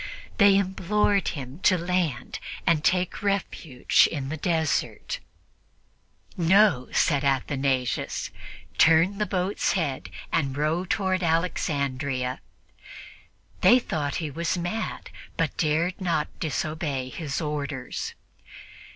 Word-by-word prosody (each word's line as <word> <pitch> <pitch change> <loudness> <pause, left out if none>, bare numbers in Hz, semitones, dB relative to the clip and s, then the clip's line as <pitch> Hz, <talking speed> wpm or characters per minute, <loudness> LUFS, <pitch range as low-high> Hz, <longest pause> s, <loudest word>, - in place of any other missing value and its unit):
They 200 -1 +7
implored 200 +1 +1
him 135 0 -5
to 185 - +4
land 175 -7 -1 0.3
and 155 -3 +3
take 180 +3 +1
refuge 195 - +2
in 140 -4 -4
the 155 - -2
desert. 160 -1 -1 1.2
"No," 175 -6 +4
said 145 -3 +2
Athanasius; 135 -2 0 0.5
"turn 165 +5 +5
the 210 - 0
boat's 190 +1 0
head 140 - -2 0.2
and 140 -3 0
row 155 +5 0
toward 190 -1 0
Alexandria." 140 -6 -1 1.2
They 245 - +7
thought 150 - -2
he 160 -4 -3
was 170 +4 -1
mad, 175 +6 -4 0.3
but - - 0
dared 165 +4 0
not 165 -5 0
disobey 155 -3 -2
his 145 0 -4
orders. 145 -4 -4
160 Hz, 105 wpm, -26 LUFS, 140-185 Hz, 1.2 s, They